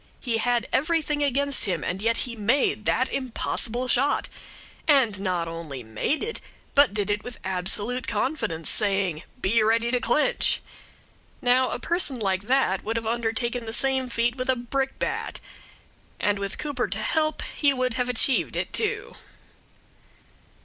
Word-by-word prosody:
He 235 -3 -1
had 240 0 +1
everything 300 +1 +1
against 280 -1 +1
him, 180 -6 -1
and 185 +3 -3
yet 230 +1 +2
he 240 -2 -6
made 215 0 +1
that 255 +1 +1
impossible 250 -1 -1
shot; 275 +3 +1 0.6
and 260 -10 +4
not 180 -3 -1
only 165 -6 -6
made 110 - -1
it, 460 +2 -4 0.3
but 285 -4 +6
did 205 0 -1
it 205 0 -1
with 245 - -8
absolute 200 +7 0
confidence, 210 - -2
saying, 195 -6 +1 0.2
"Be 220 +4 +2
ready 230 +2 +2
to 250 - +2
clench." 295 +4 +2 0.8
Now 255 +1 +3
a - - -2
person 315 -2 +1
like 195 -2 -1
that 255 -8 +2
would 225 +2 -2
have 230 - -3
undertaken 235 +1 -1
that 225 - -5
same 265 +1 +2
feat 235 +1 0
with 255 0 -3
a 260 - +4
brickbat, 265 +2 -2 0.8
and 205 -1 +1
with 200 -1 -3
Cooper 280 -5 -2
to - - -2
help 310 -1 0
he 290 -2 +1
would 255 -2 0
have 250 +1 -1
achieved 250 +2 +2
it, - - -3
too. 435 - -2
240 Hz, 155 wpm, -25 LUFS, 205-265 Hz, 0.8 s, but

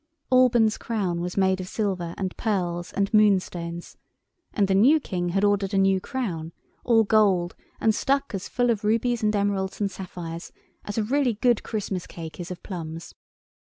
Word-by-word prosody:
Alban's 240 -4 +4
crown 190 -7 -2
was 180 +2 -4
made 190 -1 +2
of 185 - -7
silver 185 -5 -2
and 190 -2 -3
pearls 175 -5 -2
and 200 +1 -1
moonstones, 180 -5 +1 0.5
and 200 -2 +1
the 190 - +1
new 255 +11 +5
King 175 -9 -3
had 195 +3 0
ordered 200 -1 +1
a - - +3
new 195 0 +3
crown, 175 - -4 0.3
all 225 -2 +4
gold, 200 -5 +2 0.2
and 220 - +3
stuck 275 +3 0
as 195 -1 -4
full 245 -1 +2
of 215 -2 -2
rubies 230 +2 +1
and 210 0 +1
emeralds 200 -2 -1
and 200 -2 0
sapphires 175 -3 -7 0.3
as 205 - -5
a 220 - +2
really 255 0 +1
good 240 +1 +2
Christmas 195 -4 -4
cake 165 0 -9
is 175 - -6
of 180 - -8
plums. 165 -3 -7
200 Hz, 175 wpm, -25 LUFS, 180-220 Hz, 0.5 s, new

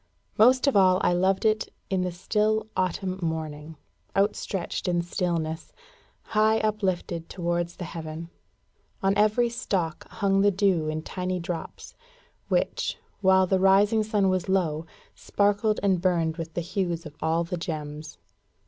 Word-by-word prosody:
Most 255 +5 +5
of 275 - +2
all, 185 -2 +5
I - - +3
loved 190 +3 +1
it 215 0 +1 0.2
in 190 -1 +1
the 180 0 -1
still 215 +5 0
autumn 185 0 -1
morning, 160 -1 -4 0.4
outstretched 195 -3 -1
in 175 -1 +1
stillness, 170 -3 -2 0.6
high 215 +1 +4
uplifted 185 -6 -1
towards 175 -1 -2
the 185 - -7
heaven. 165 0 -7 0.7
On 195 +1 +3
every 215 +3 +3
stalk 185 -9 -2
hung 195 -1 +1
the 205 - +5
dew 190 -5 +1
in 155 0 -3
tiny 185 +1 -3
drops, 170 -1 -6 0.5
which, - - 0 0.2
while 190 -1 +5
the 190 +1 +1
rising 200 +3 +4
sun 210 -2 +1
was 185 -1 0
low, 165 -4 0 0.3
sparkled 205 +1 +1
and 190 -3 +2
burned 170 -3 +1
with 165 -1 -6
the 175 - 0
hues 170 -1 -2
of 155 -1 -10
all 165 +1 +1
the 170 +1 -4
gems. 155 -3 -6
185 Hz, 145 wpm, -26 LUFS, 165-200 Hz, 0.7 s, Most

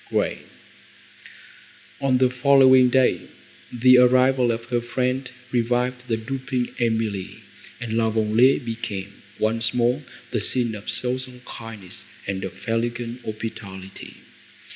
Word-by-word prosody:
GRAY - - -1 1.6
On 135 -2 +2
the 130 0 +3
following 130 -1 +6
day, 130 0 +2 0.4
the 125 +1 +6
arrival 125 0 +4
of 115 0 -4
her 120 -1 +1
friend 125 +2 -2 0.2
revived 125 +1 0
the 115 -2 0
drooping 130 +1 -3
Emily, 110 -5 -1 0.4
and 115 -2 -4
La 115 -1 +2
Vallée 115 +5 +3
became 105 -4 -5 0.2
once 115 +1 0
more 120 0 +2 0.3
the - - 0
scene 120 -3 +1
of 105 -1 -7
social 125 0 -1
kindness 115 -5 -9 0.2
and 95 -1 -3
of 95 +1 -8
elegant 120 +1 -2
hospitality. 100 -3 -7
120 Hz, 120 wpm, -23 LUFS, 110-125 Hz, 1.6 s, following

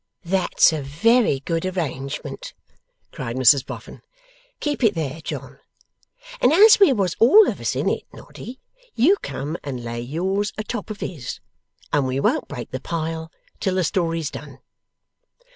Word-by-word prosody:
'That's 180 -2 +3
a 155 - -2
very 160 - +2
good 165 +3 -2
arrangement,' 155 -8 -4 0.6
cried 115 - -5
Mrs 130 +1 +5
Boffin. - - -9 0.6
'Keep 290 -3 -2
it 215 -4 +4
there, 160 -1 -3
John. - - -7 0.8
And 250 - +5
as 415 +7 +7
we 395 -7 +7
was 195 -8 0
all 360 - +7
of - - -3
us - - -1
in - - -1
it, - - -1
Noddy 255 +2 -11 0.4
you 300 - +5
come 140 +4 -4
and 130 -4 -5
lay 120 0 -4
yours 190 +10 -2
a 215 - -3
top 240 +2 -5
of 215 - -7
his, 145 -9 -5 0.5
and 145 -3 +2
we 130 +1 -1
won't - - +1
break 120 - -7
the 130 - -4
pile 160 -1 -4 0.3
till 190 -3 -1
the 185 - +1
story's 165 -4 -1
done. 140 -3 -9
165 Hz, 160 wpm, -22 LUFS, 140-210 Hz, 0.8 s, as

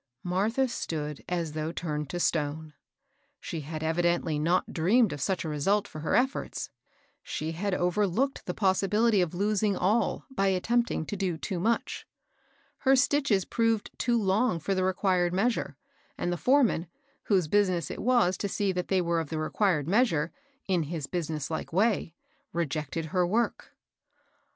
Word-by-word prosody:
Martha 210 +9 +1
stood 150 - -4
as 170 -3 -1
though 155 +1 -3
turned 150 -4 -3
to 175 - -3
stone. 155 -2 -1 0.7
She 165 - -5
had 155 +2 -6
evidently 165 -1 +1
not 170 +4 +1
dreamed 195 +4 +3
of 145 - -6
such 185 +3 -1
a - - -2
result 195 +8 +1
for 155 - -9
her 155 - 0
efforts, 260 +2 -1 0.2
— - - -38
she 155 +1 -4
had 185 +4 -1
overlooked 205 +9 0
the 180 - -2
possibility 205 +2 +3
of 175 -1 -1
losing 205 +1 +1
all 210 +3 +1
by 195 -6 +1
attempting 210 0 +1
to 205 - -4
do 185 -4 -1
too 180 +2 -3
much. 225 +6 -1 0.7
Her 270 0 +4
stitches 270 -7 +2
proved 225 -2 0
too 240 -1 +2
long 205 0 +2
for 195 +5 -1
the 185 -1 0
required 185 -1 +1
measure, 225 +5 0 0.4
and 175 - -1
the - - 0
foreman, 245 - +2 0.4
whose 185 -6 +2
business 185 -4 +1
it - - -6
was 235 -7 +3
to 200 - -2
see 200 0 0
that 180 -1 -3
they 190 -1 +2
were 170 -1 +1
of 160 -3 -4
the 160 - -3
required 155 -1 +1
measure, 175 -6 +2 0.3
in 185 -3 +1
his 155 -1 -4
business 155 -3 -3
hke 160 - -4
way, 195 -3 +1 0.4
rejected 160 -1 -2
her 180 -2 +3
work. 230 +6 -1
185 Hz, 165 wpm, -28 LUFS, 160-210 Hz, 0.7 s, Her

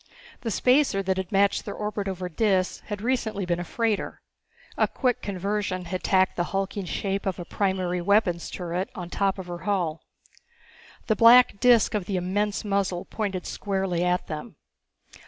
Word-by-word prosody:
The 230 - -3
spacer 250 -3 +3
that 190 0 0
had 190 -1 -4
matched 200 0 +3
their 205 - -6
orbit 210 -1 -3
over 185 -1 -3
Dis 185 +1 +1
had 205 -1 -5
recently 220 -5 -1
been 175 -1 -1
a - - -2
freighter. 220 +3 -1 0.6
A - - +2
quick 250 -3 -1
conversion 195 -1 -2
had 180 +1 -4
tacked 190 -1 +2
the 175 - +1
hulking 195 +1 -3
shape 195 +3 -2
of 190 - -1
a 175 - -6
primary 185 -2 -1
weapons 180 -3 +2
turret 180 +1 -3
on 175 -1 -7
top 195 -1 0
of 190 - -6
her 175 -1 -6
hull. 175 -6 -1 1.0
The 220 - +2
black 235 -2 +7
disc 240 -1 +5
of 205 -4 -1
the 195 -1 -2
immense 205 +4 -1
muzzle 195 -3 -1
pointed 195 -5 -3
squarely 190 -3 -1
at 180 0 +1
them. 160 +5 -7
195 Hz, 170 wpm, -26 LUFS, 180-210 Hz, 1.0 s, black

